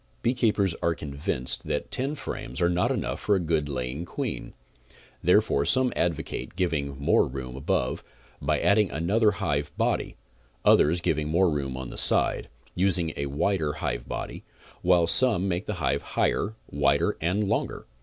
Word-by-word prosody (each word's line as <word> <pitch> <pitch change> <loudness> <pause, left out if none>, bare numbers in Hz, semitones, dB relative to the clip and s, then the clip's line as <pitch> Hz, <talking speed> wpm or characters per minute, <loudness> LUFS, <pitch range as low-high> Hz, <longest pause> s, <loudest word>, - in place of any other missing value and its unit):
Beekeepers 110 -6 +1
are 85 -1 +1
convinced 70 -3 -2
that - - -3
ten 135 +4 0
frames 65 - -6
are 85 0 +2
not 90 +1 +1
enough - - -2
for 105 - +2
a - - +1
good 80 -4 -1
laying 65 +3 -3
queen, 85 - -5 0.7
therefore 70 - +3
some 130 - +3
advocate 85 0 -2
giving 75 -7 -1
more 70 - +3
room 65 -1 -6
above, 65 -2 -1 0.4
by - - +1
adding 105 -1 +3
another 100 +8 +2
hive 75 -7 -2
body, - - -1 0.5
others 85 +4 +4
giving 75 -2 0
more 90 +2 +3
room 70 -3 -3
on 65 -1 -6
the - - 0
side, - - +4 0.2
using 90 -4 +1
a 70 - -3
wider 75 +2 0
hive - - -3
body, - - -5 0.4
while 90 -1 +4
some 105 -1 +3
make 90 +2 -2
the 105 - -2
hive 80 -5 0
higher, 110 +2 -1 0.2
wider 70 0 +2
and 90 +6 +1
longer. - - -2
85 Hz, 155 wpm, -26 LUFS, 70-95 Hz, 0.7 s, others